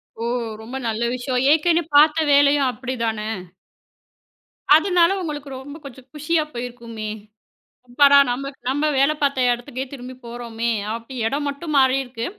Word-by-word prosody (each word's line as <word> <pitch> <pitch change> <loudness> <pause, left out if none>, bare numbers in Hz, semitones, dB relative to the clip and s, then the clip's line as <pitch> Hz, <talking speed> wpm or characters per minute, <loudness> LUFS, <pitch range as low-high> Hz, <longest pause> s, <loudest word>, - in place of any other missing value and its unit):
ஓ! 230 - -5 0.4
ரொம்ப 235 +4 -9
நல்ல 225 +1 -2
விஷயம். 255 0 -2
ஏற்கனவே 330 +2 +2
பார்த்த 310 +1 +5
வேலையும் 280 -1 +4
அப்படிதானே. 230 -4 -3 1.5
அதனால 345 +1 +4
உங்களுக்கு 295 -4 -5
ரொம்ப 285 +3 -9
கொஞ்சம் 265 -2 -12
குஷியா 305 +1 0
போயிருக்குமே. 235 -3 -6 0.8
அப்புறம் 280 +3 +6
நாம 270 +3 -3 0.2
நம்ம 290 +3 0
வேலை 275 +3 +3
பார்த்த 275 -3 +1
இடத்துக்கே 250 +2 -6
திரும்பிப் 255 -1 -10
போறோமே. 235 -1 -4 0.2
அப்படி 230 +3 -8
இடம் 285 +5 -2
மட்டும் 295 +2 -5
மாறி 265 -1 +4
இருக்கு. 245 -2 -6
265 Hz, 130 wpm, -21 LUFS, 240-290 Hz, 1.5 s, அப்புறம்